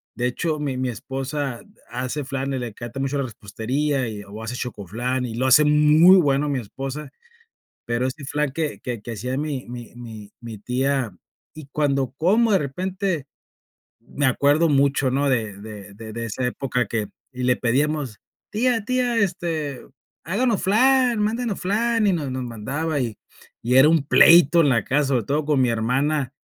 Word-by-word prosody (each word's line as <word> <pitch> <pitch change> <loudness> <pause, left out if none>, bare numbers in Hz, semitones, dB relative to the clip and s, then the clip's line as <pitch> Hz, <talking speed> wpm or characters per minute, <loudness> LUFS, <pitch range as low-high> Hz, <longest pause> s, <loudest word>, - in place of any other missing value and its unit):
De 120 - -1
hecho, 150 +5 -1
mi 145 -3 -2
mi 130 0 -1
esposa 135 +1 -4 0.3
hace 130 +4 -3
flan, 135 0 -3
le 120 - -3
encanta 120 +4 -8
mucho 135 +1 -1
la 135 - -1
repostería 125 +6 -2
y 105 -2 -6
o 100 +2 -10
hace 115 +2 -5
chocoflan 120 +3 -3
y 115 -2 -5
lo 125 +3 -1
hace 130 +4 +6
muy 150 +5 +6
bueno 145 -3 +2
mi 140 -2 0
esposa, 135 +5 -6 0.8
pero 120 +1 0
ese 135 +3 -6
flan 150 0 -1
que 155 0 -3
que 120 -3 -5
que 115 +3 -7
hacía 125 +5 -3
mi 145 -4 -3
mi 120 -1 -9
mi 110 -4 -10
mi 115 -3 -8
tía 125 -2 -1 0.4
y 155 -2 -10
cuando 140 -4 0
como, 215 +7 +3
de 195 - +5
repente, 180 +2 -3 0.7
me 135 +4 -2
acuerdo 145 +5 +3
mucho, 140 -2 +2
¿no?, 140 +2 +1
de 110 -5 0
de 105 -2 -10
de 110 +1 -9
de 115 +1 -4
esa 115 +3 -3
época 125 -1 -1
que 110 0 -2 0.3
y 125 0 -4
le 125 0 +3
pedíamos, 135 -1 -1 0.3
tía, 230 0 +1
tía, 250 0 0
este, 170 - -2 0.4
háganos 210 - 0
flan, 250 +4 +3
mándenos 220 0 -1
flan, 225 +3 +1
y 195 - +3
nos 150 -6 -2
nos 130 0 -3
mandaba, 135 +7 -3
y 115 -4 -3 0.5
y 120 +2 0
era 135 +3 +8
un 160 -3 +3
pleito 170 +2 +6
en 155 - +4
la 115 -6 +2
casa, 145 +2 +1
sobre 125 -5 +1
todo 145 +7 -1
con 145 -2 +1
mi 125 - +3
hermana, 130 +5 0
135 Hz, 175 wpm, -23 LUFS, 120-155 Hz, 0.8 s, era